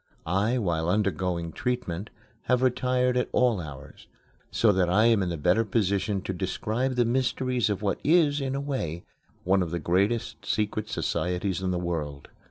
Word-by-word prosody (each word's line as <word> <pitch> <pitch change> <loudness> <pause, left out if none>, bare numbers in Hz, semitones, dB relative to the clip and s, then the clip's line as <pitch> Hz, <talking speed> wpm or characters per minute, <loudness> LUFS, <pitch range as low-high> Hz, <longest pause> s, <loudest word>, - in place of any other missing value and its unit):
I, 100 +9 +1
while 85 -7 0
undergoing 90 -3 0
treatment, 105 -4 -3 0.4
have 125 0 +2
retired 125 0 +2
at 125 - 0
all 120 -7 +2
hours, 70 -4 -11 0.4
so 110 - +3
that 90 -3 +2
I 105 +5 +4
am 115 -3 +4
in 90 - -1
the 85 - -3
better 90 +9 +3
position 100 -2 0
to 95 - -3
describe 110 +7 -2
the 120 -1 +3
mysteries 125 -1 0
of 105 0 -2
what 100 - 0
is, 150 -3 +3
in 135 0 -2
a 140 - -2
way, 85 - -3 0.4
one 95 +1 +3
of 85 - -1
the 85 - -2
greatest 100 +7 0
secret 105 0 -1
societies 90 +1 -1
in 95 - -1
the 90 - 0
world. 80 -5 -4
100 Hz, 175 wpm, -27 LUFS, 90-125 Hz, 0.4 s, I